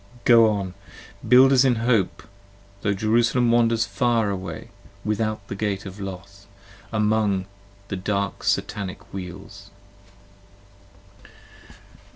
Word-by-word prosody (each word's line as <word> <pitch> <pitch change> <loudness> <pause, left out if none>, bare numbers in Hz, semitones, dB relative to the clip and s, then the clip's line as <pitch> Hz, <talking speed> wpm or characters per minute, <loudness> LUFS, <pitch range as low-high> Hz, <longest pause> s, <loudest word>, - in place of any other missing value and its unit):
Go 115 -2 +7
on, 100 -3 -3 0.5
builders 130 +2 +6
in 130 -2 +3
hope: 115 -4 0 0.6
tho' 100 0 0
Jerusalem 115 +3 +2
wanders 115 -1 +3
far 115 -5 +1
away, 90 -4 -6 0.4
Without 110 -1 -2
the - - -5
gate 100 -1 -3
of 95 +1 -9
Los: 100 +1 -9 0.4
among 105 -3 +1 0.4
the 95 - -3
dark 100 +1 -2
Satanic 100 -3 -3
wheels. 95 +1 -9
105 Hz, 100 wpm, -23 LUFS, 100-115 Hz, 0.6 s, Go